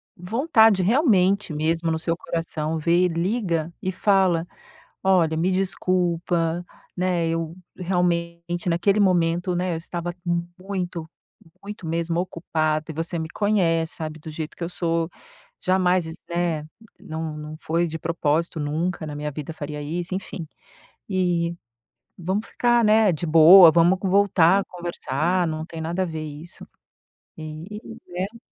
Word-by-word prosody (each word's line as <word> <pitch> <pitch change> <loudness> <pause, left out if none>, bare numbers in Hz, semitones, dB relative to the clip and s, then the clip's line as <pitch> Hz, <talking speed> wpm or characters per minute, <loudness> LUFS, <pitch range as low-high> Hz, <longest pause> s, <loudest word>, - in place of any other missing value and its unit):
vontade 220 - +3
realmente 200 - +3
mesmo 165 +2 0
no 160 - 0
seu 165 +1 -1
coração, 165 -2 -3
vê 170 +3 +3
e - - +4
liga 170 -2 -1
e 185 - -1
fala: 185 -3 +2 0.5
"Olha 175 -4 +3
me 170 +3 +1
desculpa, 175 -2 0 0.3
né, 180 -2 +1
eu, 165 0 -2 0.2
realmente, 175 -1 -1
naquele 185 +5 +2
momento, 175 -2 +2
né, 180 0 -1
eu - - -2
estava 175 +1 -5 0.5
muito 180 -4 -4 0.5
muito 205 -4 -7
mesmo 165 +1 -1
ocupada 155 -3 -1
e - - -4
você 165 +2 -3
me 160 0 -4
conhece 170 -6 +1
sabe 155 -1 -6
do 160 - -9
jeito 155 0 -6
que - - -5
eu 170 - -1
sou, 165 -2 -1 0.5
jamais 185 -1 +2 0.3
né, 170 -3 -1 0.3
não 160 -1 -5
não 150 +1 -8
foi 170 +2 0
de 160 0 -5
propósito 165 0 -1
nunca 160 +3 -2
na 150 -1 -6
minha 150 0 -4
vida 150 +2 -6
faria 150 -1 -6
isso, 170 +5 -4
enfim, 185 -3 -6 0.6
e 175 -3 0 0.6
vamos 190 +5 -2
ficar, 240 -1 +2
né, 215 -1 +5
de 160 +2 -3
boa 165 +2 +9
vamos 175 +3 +4
voltar 195 -1 +4
a - - -7
conversar 175 0 -1
não 155 0 -3
tem 165 -1 -9
nada 170 +4 -1
a - - -1
ver 160 -2 -5
isso 150 +3 -10 0.7
e 160 +6 -7 0.3
né" 190 +6 -4
170 Hz, 145 wpm, -24 LUFS, 160-185 Hz, 0.7 s, boa